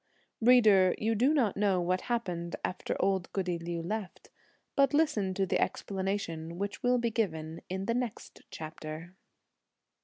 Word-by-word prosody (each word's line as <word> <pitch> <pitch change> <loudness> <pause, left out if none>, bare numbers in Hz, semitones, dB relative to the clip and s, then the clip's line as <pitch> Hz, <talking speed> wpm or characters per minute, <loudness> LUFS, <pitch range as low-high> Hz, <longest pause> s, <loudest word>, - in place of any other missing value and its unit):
Reader, 215 -6 +6
you 220 +1 +1
do 245 +7 +3
not 250 -10 +2
know 195 -2 +2
what 180 +1 0
happened 180 -8 -2
after 185 - -3
old 190 -2 +1
goody 180 -3 -1
Liu 170 0 -4
left, 205 +1 -5 0.4
but 275 -1 +4
listen 210 -12 +2
to 195 - +1
the - - 0
explanation 190 -4 -2
which 200 +2 -4
will 250 0 +3
be 235 -1 0
given 160 -7 -2
in 190 +1 -3
the 230 - +1
next 245 -2 -4
chapter. 155 +2 -7
195 Hz, 150 wpm, -30 LUFS, 175-225 Hz, 0.4 s, Reader